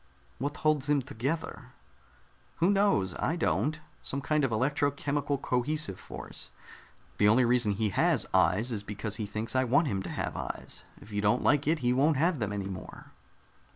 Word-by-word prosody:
"What 145 +3 -3
holds 150 -2 +1
him 145 -2 +3
together?" 135 +7 -4 0.8
"Who 175 +4 +3
knows? 195 - +2
I 160 - 0
don't. 155 - 0 0.2
Some 140 - -3
kind 150 +2 +1
of 135 - +1
electro 140 +5 +1
chemical 145 0 -1
cohesive 130 - -1
force. - - -9 0.7
The 105 - +5
only 120 +4 +5
reason 120 -3 +3
he 105 +1 0
has 160 - +2
'eyes' 95 +6 +3
is 110 -3 -2
because 105 +1 -4
he 105 - -3
thinks 110 +4 -3
I 130 - +4
want 140 +6 +3
him 100 -9 -1
to - - -6
have - - -3
eyes. - - -5 0.2
If 105 - -14
you 105 0 -1
don't 105 +4 +2
like 145 -1 +3
it, 160 +1 +2
he 120 - +4
won't 145 +3 +3
have 165 +1 +2
them 105 -3 -1
any 100 -1 -3
more." 95 -2 -9
130 Hz, 185 wpm, -29 LUFS, 105-150 Hz, 0.8 s, The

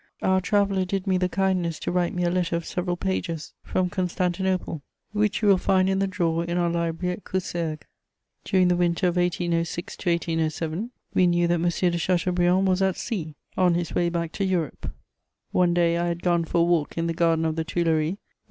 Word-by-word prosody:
Our 190 0 +3
traveller 200 0 +2
did 190 +1 -2
me 185 -2 +2
the 180 0 +1
kindness 180 -4 0
to - - -2
write 175 -1 +1
me 180 - 0
a 175 - +2
letter 175 -2 0
of 170 -1 -3
several 180 -1 -2
pages 175 -4 -3
from 180 -1 -1
Constantinople, 185 -2 -1 0.3
which 210 +1 0
you - - +4
will 195 -2 +6
find 185 0 +2
in 190 0 +1
the 195 - +1
drawer 170 -3 0
in 170 +1 -2
our 175 -1 +1
library 170 +1 -1
at 195 - -9
Coussergues. 170 -4 -3 0.6
During 185 -2 +3
the 180 - +3
winter 175 +1 +1
of 175 - -3
1806 175 -1 -1
to 180 - -2
1807, 165 +3 -1 0.2
we 185 - +4
knew 175 0 +2
that 170 - +2
M. 175 - +2 0.2
de 170 - -1
Chateaubriand 180 +2 +2
was 185 0 +2
at 190 -1 +1
sea, 160 -9 -4 0.2
on 180 -2 +3
his 175 -1 -2
way 175 -1 +2
back 170 -1 -2
to 200 - -3
Europe; 180 -5 -2 0.6
one 180 -1 +3
day 170 -1 +3
I 175 - 0
had 170 0 -3
gone 170 -2 +2
for 170 +1 +1
a - - +5
walk 170 -3 +1
in 165 - 0
the 165 - 0
garden 165 -1 +2
of 160 -1 0
the 160 - -1
Tuileries 160 -1 +1
with - - -10
M. - - -49
175 Hz, 215 wpm, -25 LUFS, 170-185 Hz, 0.6 s, will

